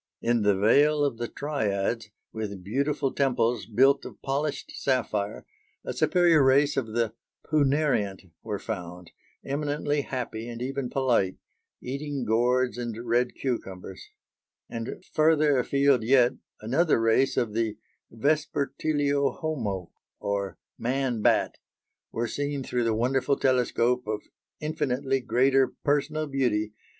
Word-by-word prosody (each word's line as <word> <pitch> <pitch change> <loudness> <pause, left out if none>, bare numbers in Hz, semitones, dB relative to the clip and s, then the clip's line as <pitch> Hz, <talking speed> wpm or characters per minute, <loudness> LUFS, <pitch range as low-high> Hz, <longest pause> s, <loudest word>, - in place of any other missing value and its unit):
In 120 -1 +1
the 100 -2 +3
"Vale 145 +8 +4
of 125 -5 -2
the 120 - -2
Triads," 110 -6 -2 0.2
with 100 -4 -5
beautiful 140 +6 -1
temples 120 -4 +1
built 135 +5 +4
of - - -10
polished 140 +1 -2
sapphire, 110 -6 -1 0.4
a - - -3
superior 170 -5 +4
race 140 +2 +4
of 115 -5 -2
the 115 -2 0 0.3
punariant 135 - +1
were 105 -2 -3
found, 90 -4 -6 0.3
"eminently 145 +1 -1
happy 120 -4 -5
and 115 -1 -7
even 135 +1 -3
polite," 120 -9 +1 0.5
eating 140 0 -4
gourds 125 +3 +2
and 120 -2 -4
red 120 +1 +1
cucumbers; 95 -7 -5 0.6
and 115 0 -6
further 155 -3 +4
afield 140 0 +3
yet 125 +2 +4 0.3
another 135 +7 +2
race 115 +4 +2
of 110 -4 0
the 110 -1 -1 0.3
vespertilio 145 +1 0
homo, 105 - -3 0.3
or 100 -1 -2 0.2
man 125 -2 -1
bat, - - +2 0.5
were 115 +1 -2
seen 145 +3 -3
through 125 -2 -1
the 115 -1 +1
wonderful 130 +4 +1
telescope 125 -2 +1
of 105 -1 -3 0.4
"infinitely 140 -3 -1
greater 130 +2 +3 0.2
personal 150 +1 +1
beauty 120 -7 0
125 Hz, 120 wpm, -27 LUFS, 110-140 Hz, 0.6 s, Vale